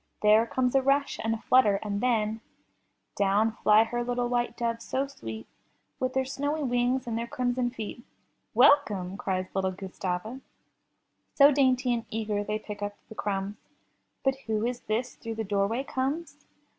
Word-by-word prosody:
There 215 +2 +5
comes 250 +1 0
a 270 - +4
rush 275 +1 +1
and 225 0 +1
a 225 - -9
flutter, 235 -6 +4
and 205 -1 -2
then 225 -3 +1 0.7
Down 205 +3 +2
fly 215 -1 +5
her 240 +1 -2
little 245 0 -1
white 240 0 -1
doves 230 -1 -2
so 265 +3 -1
sweet, 110 - -8 0.5
With 255 0 -1
their 265 0 +2
snowy 285 +3 -2
wings 245 0 +1
and 235 -2 -3
their 230 +1 -2
crimson 245 0 0
feet. 235 -1 -7 0.3
* - - -47
'Welcome!'* 220 -8 +4
cries 185 -2 -3
little 190 -1 +1
Gustava. 190 +5 -4 0.9
So 285 +1 +8
dainty 260 -3 +3
and 230 -1 -2
eager 215 -2 -2
they 210 +1 -2
pick 210 -1 -8
up 205 0 -3
the - - -8
crumbs. 200 -1 -3 0.7
But 270 0 +2
who 220 0 0
is 245 0 -2
this 235 +3 -2
through 225 -1 -7
the 220 - -2
doorway 205 +5 0
comes? 290 +3 -3
230 Hz, 170 wpm, -28 LUFS, 210-255 Hz, 0.9 s, So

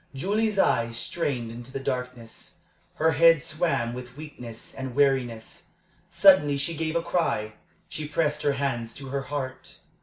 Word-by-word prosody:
Julie's 210 +8 0
eyes 115 -10 +2
strained 120 -3 -2
into 120 +2 -9
the 135 - -4
darkness; 125 -3 -5 0.3
her 160 +1 +3
head 165 +1 +5
swam 155 -8 0
with 125 +1 -9
weakness 125 -7 -9
and 130 -2 -6
weariness. 130 -5 0 0.4
Suddenly 185 -8 +6
she 140 +4 -1
gave 160 +1 -2
a 170 - +1
cry 135 -12 0 0.3
she 155 -1 -5
pressed 150 -1 0
her 145 - +2
hands 120 -5 -2
to 135 -1 -8
her 140 +1 -2
heart. 135 -1 -6
140 Hz, 150 wpm, -26 LUFS, 120-160 Hz, 0.4 s, Suddenly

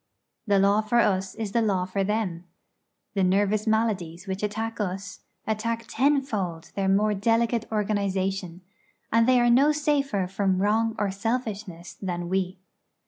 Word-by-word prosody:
The 200 -1 +4
law 200 +2 +4
for 220 +2 0
us 190 -4 +1
is 220 -3 -4
the 235 - +2
law 195 -4 +1
for 195 +1 -1
them. 190 -4 -2 0.7
The 195 -2 +1
nervous 205 +3 +2
maladies 205 -6 0
which 190 0 -4
attack 220 +2 -3
us, 195 -1 -4 0.3
attack 230 +1 -2
tenfold 225 - 0
their 195 -1 0
more 210 +2 +3
delicate 230 +2 +1
organisation; 195 -4 -1 0.5
and 230 +1 +4
they 255 -1 +5
are 240 0 +4
no 275 +5 +5
safer 280 -9 0
from 190 0 0
wrong 220 +3 +1
or 205 -2 0
selfishness 205 -5 -4
than 175 -2 -3
we. 185 0 -1
205 Hz, 145 wpm, -26 LUFS, 190-225 Hz, 0.7 s, they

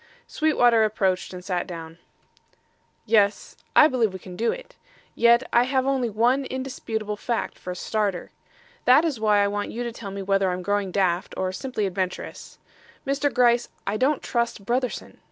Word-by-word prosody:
Sweetwater 245 -7 +3
approached 195 -4 0
and 180 -1 -9
sat 180 -3 -2
down. 165 -1 -8 1.1
"Yes; 205 -2 +2 0.2
I 300 - +8
believe 235 -8 0
we - - -5
can 180 -1 -11
do 230 +5 +1
it; - - -9 0.4
yet 235 +1 +4
I 240 +1 +5
have 260 0 0
only 265 -3 +1
one 240 +6 +2
indisputable 230 -5 -4
fact 235 +2 -3
for - - -8
a 180 - -3
starter. 200 -1 -2 0.5
That 265 +6 +6
is 290 -8 -1
why 210 -2 +3
I - - +2
want 205 0 -3
you 240 - -4
to 235 - -3
tell 225 -3 -8
me 195 0 -5
whether 195 0 +2
I'm 180 0 -3
growing 205 0 0
daft 180 -2 0
or 185 0 -1
simply 220 +1 -3
adventurous. 185 -1 -4 0.5
Mr. 280 +1 0
Gryce, 240 -1 +3 0.2
I 200 - -1
don't 265 +6 +1
trust 235 -4 -2
Brotherson. 250 +3 -2
220 Hz, 170 wpm, -24 LUFS, 195-250 Hz, 1.1 s, I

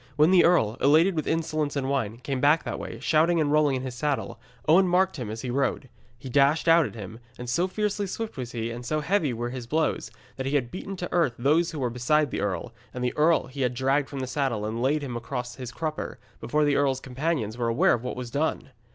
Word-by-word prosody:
When 155 +4 +5
the 185 -2 +6
earl, 120 -11 +3
elated 160 +6 +4
with 155 - -2
insolence 155 -2 -1
and 135 -2 -1
wine, 115 -6 -1
came 130 +1 -3
back 150 +3 +4
that - - -4
way, - - -7
shouting 165 +2 +3
and 150 -2 +1
rolling 150 -2 +3
in 130 - -3
his 130 -1 -5
saddle, 140 +3 -2 0.3
Owen 180 +5 +6
marked 185 0 +2
him 120 -5 -5
as 110 +3 -6
he 125 - -3
rode. 135 0 -1 0.3
He 125 - -10
dashed 140 +5 +3
out 165 -1 +6
at - - -11
him, 110 +1 -8 0.2
and 125 - -7
so 170 +10 +1
fiercely 205 +1 -1
swift 225 +3 -5
was 125 -3 -5
he, 115 -1 -3
and 120 +1 -7
so 155 +5 -1
heavy 165 -3 +1
were 120 +1 -3
his 125 -2 -6
blows, 155 +5 0 0.3
that 135 0 -3
he 140 - 0
had 125 -4 0
beaten 195 +1 -6
to 180 - -4
the - - -8
earth 160 -9 +2
those 155 +7 +2
who 160 - -7
were 125 -4 -1
beside 140 +4 +1
the - - -2
earl, 100 +3 -3 0.2
and 125 - -3
the 125 - -1
earl 160 +2 +3
he 135 +2 -7
had 125 -1 0
dragged 135 +2 +1
from 140 -2 -5
the - - -2
saddle 130 -5 -1
and 110 +2 -3
laid 145 +4 +1
him 125 -4 -5
across 125 +1 -5
his 125 -3 -6
crupper, 155 +4 -4 0.2
before 150 +4 +1
the 145 -1 +2
earl's 135 -2 +2
companions 130 -4 -2
were 120 -1 -1
aware 115 0 +3
of 120 - -1
what 125 - -4
was 125 -2 -6
done. 145 0 -1
140 Hz, 250 wpm, -26 LUFS, 125-155 Hz, 0.3 s, the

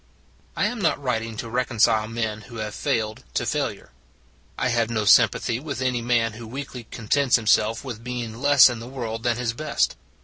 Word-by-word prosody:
I - - +2
am 240 -3 -2
not 165 - +1
writing 115 -4 -2
to 115 - -5
reconcile 115 -2 +2
men 110 -2 -3
who 120 - -10
have 110 -1 -4
failed, 110 -1 -2
to - - 0
failure; - - -3 0.7
I - - 0
have 115 -1 +1
no 110 -2 -1
sympathy 115 +3 +4
with 140 -1 -5
any 130 -2 0
man 115 -2 +1
who 115 +1 -9
weakly 125 -1 -7
contents 125 +4 +1
himself 110 0 +2
with 115 -3 -7
being 120 -2 -5
less 145 -1 +7
in 120 -2 -3
the 115 - -8
world 115 -4 -5
than 120 -1 0
his 120 -2 -1
best. 155 +6 0
115 Hz, 190 wpm, -24 LUFS, 110-125 Hz, 0.7 s, less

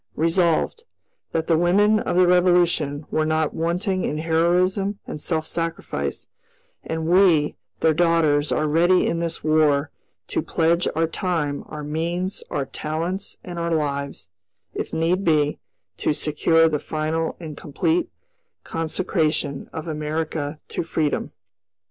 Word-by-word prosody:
"Resolved, 165 - +1 0.5
That 160 0 -1
the 165 -1 +3
women 205 +5 +4
of - - -2
the 180 0 +6
Revolution 175 -5 +3
were 155 - +1
not 155 0 0
wanting 180 +3 -1
in 150 - -1
heroism 180 +5 +1
and 150 - -6
self 160 -1 -1
sacrifice, 165 0 -3 0.6
and 160 0 -3
we, 175 -4 +4 0.3
their 160 -1 +4
daughters, 160 -3 +2
are 155 - +1
ready, 175 +4 +4
in 165 - 0
this 170 -1 -3
War, 155 -2 +3 0.4
to - - 0
pledge 170 +2 +1
our 165 +1 +2
time, 160 -4 -2
our 150 -1 -7
means, 170 +5 -2
our 140 - -1
talents, 165 +8 -4
and 175 -1 -6
our 170 0 0
lives, 140 -8 -3 0.4
if - - -4
need 170 +4 +1
be, 150 -3 +2 0.4
to - - +1
secure 165 +2 +3
the 150 -2 0
final 160 +2 -2
and 155 -3 -7
complete 320 - -1 0.5
consecration 160 -3 -1
of 160 +1 -6
America 155 -1 -3
to - - -2
freedom." 160 -3 -1
165 Hz, 135 wpm, -23 LUFS, 155-175 Hz, 0.6 s, the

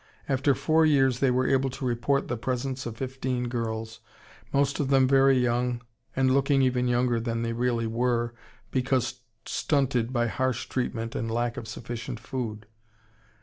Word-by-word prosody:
After 135 +1 +2
four 160 +4 +3
years 135 -5 +3
they 135 - +3
were 130 +1 +2
able 135 0 +2
to 130 +1 -6
report 125 +3 +1
the 120 - -1
presence 130 +2 -3
of 115 -1 -7
fifteen 130 -1 -2
girls, 110 -2 -3 0.5
most 140 0 +1
of 145 - +1
them 135 -1 +4
very 135 0 +5
young 125 0 0 0.3
and 130 -1 +3
looking 135 0 +3
even 125 -1 +2
younger 120 -1 +2
than 115 0 -2
they 115 0 -1
really 120 -1 0
were 120 +1 0 0.4
because 130 -2 0 0.2
stunted 125 -5 0
by 120 -2 +1
harsh 130 +2 -1
treatment 115 -3 -2
and 115 - -2
lack 120 +1 -1
of 110 - -6
sufficient 120 +2 -6
food. 110 -5 -5
125 Hz, 160 wpm, -27 LUFS, 120-135 Hz, 0.5 s, very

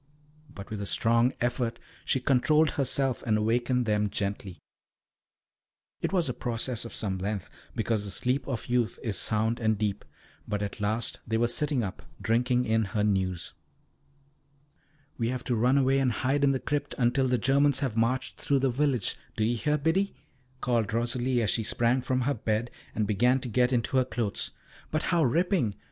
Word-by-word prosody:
But 100 -7 -10
with 105 -2 -4
a 100 - -3
strong 115 +10 +3
effort 120 -1 -1 0.3
she 130 - +1
controlled 150 +5 +3
herself 135 -2 0
and 110 -2 +1
awakened 120 +3 +1
them 105 -1 +1
gently. 100 -2 -3 1.4
It - - -1
was 180 -5 +2
a 125 - -1
process 120 0 -3
of 115 - -7
some 95 -3 -2
length, 100 0 -3 0.3
because 110 -2 0
the 100 - -5
sleep 125 +6 0
of 130 -5 -3
youth 120 -2 0
is 110 -4 -2
sound 110 +2 0
and 110 -2 +1
deep, 105 -1 -2 0.4
but 105 -1 -2
at 100 - -5
last 110 +2 -1
they 110 0 +1
were 120 +1 +2
sitting 140 +1 0
up, 95 -3 -5 0.2
drinking 125 +2 +1
in 110 0 +2
her 105 - +2
news. 95 -4 0 1.7
"We 115 - +1
have 125 0 -3
to 125 - 0
run 125 +5 +3
away 135 0 +3
and 130 -2 +2
hide 135 +4 0
in 140 - +5
the 135 - 0
crypt 145 0 -2
until 130 +1 +2
the 125 0 +2
Germans 140 +3 +3
have 130 -6 -1
marched 120 +3 0
through 140 - +2
the 135 -1 +2
village. 130 -4 +1 0.2
Do 110 - 0
you 115 +2 +2
hear, 150 +6 +1
Biddy?" 165 +7 +1 0.5
called 115 -4 0
Rosalie, 120 +1 0
as 105 - +2
she 115 - 0
sprang 120 +3 +1
from 130 0 0
her 140 +3 +1
bed 110 0 -1 0.2
and 110 - +1
began 120 +6 +3
to 125 - -4
get 125 +2 +2
into 125 +1 +1
her 130 - +4
clothes. 115 -5 -2 0.4
"But 155 0 -1
how 170 -2 +4
ripping! 155 - +1
120 Hz, 185 wpm, -28 LUFS, 110-130 Hz, 1.7 s, in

